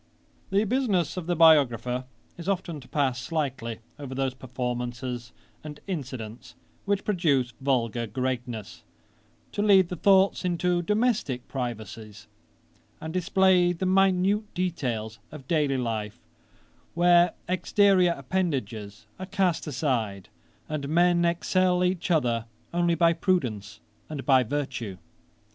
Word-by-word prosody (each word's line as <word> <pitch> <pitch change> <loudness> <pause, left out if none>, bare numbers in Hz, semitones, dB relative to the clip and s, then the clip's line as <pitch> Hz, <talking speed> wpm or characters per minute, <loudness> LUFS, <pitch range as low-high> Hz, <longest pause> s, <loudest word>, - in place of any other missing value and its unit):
'The 200 +2 +2
business 210 - 0
of 180 -3 -5
the 175 - +1
biographer 130 -6 +4 0.3
is 175 +2 -6
often 175 -5 -2
to 130 - -14
pass 130 -4 0
slightly 130 -8 -3 0.2
over 135 -2 -6
those 135 -1 -1
performances 125 -1 -4 0.3
and 150 -1 -8
incidents 125 - -6 0.3
which 200 0 0
produce 145 - +1
vulgar 120 -4 0
greatness, 120 -2 -4 0.7
to 205 - -2
lead 195 -4 +5
the 180 - -3
thoughts 195 +3 +4
into 175 0 +1
domestick 210 - 0
privacies, 110 -4 -6 0.7
and 160 0 -6
display 185 0 +3
the 180 +2 -3
minute 195 +2 +2
details 120 -12 -2
of 145 -4 -11
daily 145 -4 +1
life, 110 -4 -3 0.8
where 175 0 +5
exteriour 185 0 +3
appendages 120 - -3
are 185 - -6
cast 185 -5 0
aside, 120 - -2 0.4
and 145 -2 -4
men 175 +2 +3
excel 180 +1 +2
each 180 -1 -1
other 120 -9 +1 0.3
only 175 -1 +2
by 170 0 +4
prudence 115 - -1 0.3
and 145 -5 -6
by 135 -2 +5
virtue. 125 -6 -3
150 Hz, 120 wpm, -26 LUFS, 125-180 Hz, 0.8 s, lead